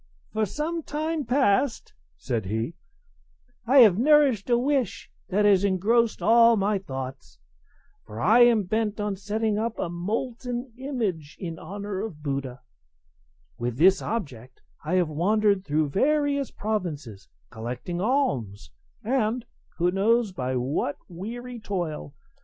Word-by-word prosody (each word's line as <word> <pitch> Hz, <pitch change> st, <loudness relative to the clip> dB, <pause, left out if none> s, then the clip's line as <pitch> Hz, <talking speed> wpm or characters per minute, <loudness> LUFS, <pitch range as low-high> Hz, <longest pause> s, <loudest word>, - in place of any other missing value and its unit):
"For 215 Hz, -1 st, 0 dB
some 320 Hz, -, -3 dB
time 310 Hz, 0 st, -3 dB
past," 245 Hz, -1 st, +1 dB, 0.2 s
said 110 Hz, -, -3 dB
he, 110 Hz, -, -2 dB, 0.9 s
"I 265 Hz, +2 st, +7 dB
have 210 Hz, -4 st, +6 dB
nourished 275 Hz, -6 st, +4 dB
a 240 Hz, -, +4 dB
wish 260 Hz, -3 st, -1 dB, 0.2 s
that 205 Hz, +2 st, +2 dB
has 200 Hz, -2 st, +5 dB
engrossed 205 Hz, +2 st, +2 dB
all 230 Hz, +2 st, +6 dB
my 200 Hz, 0 st, +1 dB
thoughts; 130 Hz, -, -7 dB, 0.7 s
for 105 Hz, +1 st, -8 dB
I 220 Hz, -, +5 dB
am 240 Hz, -3 st, +6 dB
bent 215 Hz, +2 st, -1 dB
on 205 Hz, -1 st, -1 dB
setting 210 Hz, +2 st, -1 dB
up 230 Hz, +1 st, -2 dB
a -, -, -2 dB
molten 240 Hz, +7 st, -4 dB
image 220 Hz, -, -3 dB
in 165 Hz, -3 st, -6 dB
honour 200 Hz, +2 st, -5 dB
of 170 Hz, -9 st, -7 dB
Buddha; 135 Hz, -3 st, -4 dB, 1.0 s
with 120 Hz, 0 st, -3 dB
this 190 Hz, +6 st, +5 dB
object 130 Hz, -, -5 dB, 0.2 s
I 160 Hz, +4 st, -1 dB
have 180 Hz, -2 st, +3 dB
wandered 200 Hz, +5 st, +2 dB
through 150 Hz, -2 st, 0 dB
various 280 Hz, -, +1 dB
provinces 155 Hz, -, -4 dB, 0.2 s
collecting 125 Hz, +10 st, -5 dB
alms, 130 Hz, -, -1 dB, 0.3 s
and 235 Hz, 0 st, 0 dB, 0.3 s
(who 175 Hz, +1 st, +2 dB
knows 215 Hz, +3 st, +2 dB
by 130 Hz, -7 st, -3 dB
what 135 Hz, +3 st, -1 dB
weary 235 Hz, +7 st, -7 dB
toil?) 175 Hz, -, -4 dB
205 Hz, 130 wpm, -26 LUFS, 155-235 Hz, 1.0 s, I